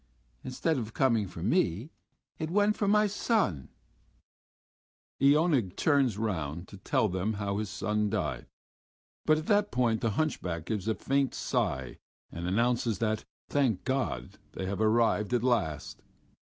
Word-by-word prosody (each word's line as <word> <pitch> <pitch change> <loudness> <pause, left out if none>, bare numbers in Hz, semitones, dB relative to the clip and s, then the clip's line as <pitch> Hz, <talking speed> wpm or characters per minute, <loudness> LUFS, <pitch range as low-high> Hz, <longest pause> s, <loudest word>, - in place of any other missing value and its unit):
Instead 135 +4 -1
of 115 -1 -6
coming 115 -7 +2
for 85 -2 -8
me 115 - +1 0.5
it 155 - -2
went 205 +3 +3
for 205 - -1
my 210 +1 +4
son...." 200 - 0 1.5
And 140 - +5
Iona 150 -2 +4
turns 135 - +2
round 85 -6 -3
to 100 - -10
tell 100 +3 +1
them 95 +3 -1
how 100 -1 -2
his 105 -2 -3
son 105 +1 -1
died, 105 -3 -2 0.8
but 155 0 +5
at 155 - -4
that 205 +1 +3
point 115 -3 +1
the 115 - +1
hunchback 90 - -1
gives 105 -1 -3
a 110 - +1
faint 135 0 0
sigh 65 -2 -2 0.3
and 85 +1 -5
announces 115 +2 +1
that, 110 +1 -1 0.2
thank 130 -9 +1
God! 130 - -2
they 95 - -4
have 100 +2 -3
arrived 110 0 +2
at 120 - 0
last. 80 - -1
110 Hz, 150 wpm, -29 LUFS, 100-140 Hz, 1.5 s, And